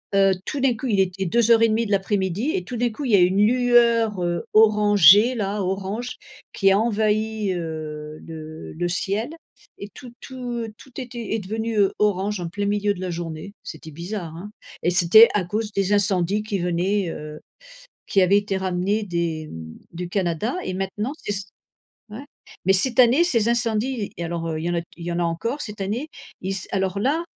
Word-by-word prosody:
heu, 195 -1 +5
tout 290 - -3
d'un 260 -2 +2
coup, 255 +4 -5
il 205 -4 +1
était 190 0 0
14:30 230 +2 +3
de 210 - -5
l'après-midi 195 - 0
et 380 - -1
tout 245 - -6
d'un 245 +1 +1
coup, 275 +6 -6
il 240 - -1
y - - +7
a - - +5
une 185 +3 +4
lueur, 235 -4 +3
heu, 175 -1 -1
orangée 210 0 +6
là, 205 -2 -2
orange, 195 +6 -3 0.4
qui 195 0 +3
a 195 - +4
envahi, 215 -2 0
heu, 155 -2 -6
le 155 -1 -9
le 175 +2 -2
ciel 200 - -1 0.5
et 200 - -7
tout 250 -4 -11
tout 245 -3 -5
tout 265 - -16
était 235 -3 -6
est - - -1
devenu, 220 +3 -3
heu, 195 -1 +4
orange 205 -1 0
en 175 - -4
plein 205 +3 -3
milieu 205 0 +1
de 185 - -9
la 185 - -3
journée. 165 +2 -6
C'était 155 0 -9
bizarre, 170 +1 -6
hein 190 +5 -8 0.3
et 175 - +2
c'était 180 +6 +7
à 205 -3 +1
cause 210 +3 -3
des 200 +1 +1
incendies 200 -1 +1
qui 205 -3 -3
venaient, 180 +2 0
heu, 150 -1 -7 0.7
qui 195 - +3
avaient 190 +2 +4
été 205 -1 -2
ramenés 190 +3 -1
des, 170 -4 -2
hem, 80 - -9 0.2
du 175 +1 -5
Canada, 190 - -1
et - - -3
maintenant 200 +7 -3
c'est - - -1
c 200 -1 -3 0.7
ouais. 235 +7 -9 0.4
Mais 190 - +5
cette 240 +6 +2
année, 255 +7 +6
ces 230 -11 +1
incendies 235 -1 0
et 170 - -4
alors, 170 0 -3
heu, 155 -1 -3
il - - -5
y - - 0
en - - -1
a - - 0 0.2
il 170 - -8
y 175 - -3
en 170 - -2
a - - +1
encore 200 - -2
cette 210 -3 -6
année, 220 +10 -3 0.3
ils 190 - -3
s 190 - -4
alors 190 0 -1
là, 295 +9 +1
200 Hz, 200 wpm, -23 LUFS, 180-225 Hz, 0.7 s, y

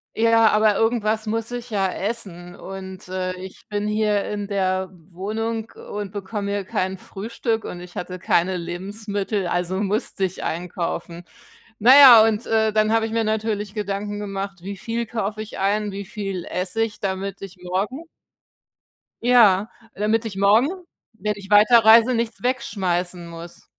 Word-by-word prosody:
Ja, 230 0 +4
aber 215 -1 +3
irgendwas 220 0 0
muss 225 +1 -2
ich 245 0 -6
ja 200 -3 +1
essen. 185 -5 -5
Und, 190 -1 -9
äh, 185 0 -2
ich 185 +1 -11
bin 205 0 -2
hier 210 -1 +1
in 205 -1 -4
der 190 -2 -1 0.2
Wohnung 220 +5 -3
und 205 -2 -7
bekomme 200 0 -4
hier 200 -1 -1
kein 190 +1 -2
Frühstück 220 +4 -3
und 175 - -6
ich 175 0 -12
hatte 180 +1 -5
keine 180 +1 +1
Lebensmittel, 200 +3 -3
also, 180 +2 -1
musste 205 0 -1
ich 190 -1 -2
einkaufen. 170 0 -4 0.5
Na 230 +4 +6
ja, 250 -6 +10
und, 220 +1 -1
äh, 220 -1 +2
dann 215 0 +2
habe 225 0 +2
ich 225 - -5
mir 225 0 +1
natürlich 215 -2 -2
Gedanken 205 0 -3
gemacht: 195 -2 -5
„Wie 200 0 -6
viel 230 +4 -3
kaufe 215 -1 -3
ich 220 - -9
ein, 205 +1 0
wie 200 0 -6
viel 195 -4 -5
esse 185 +4 -3
ich, 215 -2 -2
damit 195 0 -3
ich 195 -1 -9
morgen“ 205 - -3 1.2
Ja, 225 -4 +5 0.3
damit 215 +2 +1
ich 215 -4 -6
morgen, 210 +8 +4 0.4
wenn 210 -1 -2
ich 195 -1 -11
weiterreise, 225 +3 +7
nichts 230 0 -2
wegschmeißen 185 -8 -2
muss. 170 0 -11
205 Hz, 155 wpm, -22 LUFS, 190-220 Hz, 1.2 s, ja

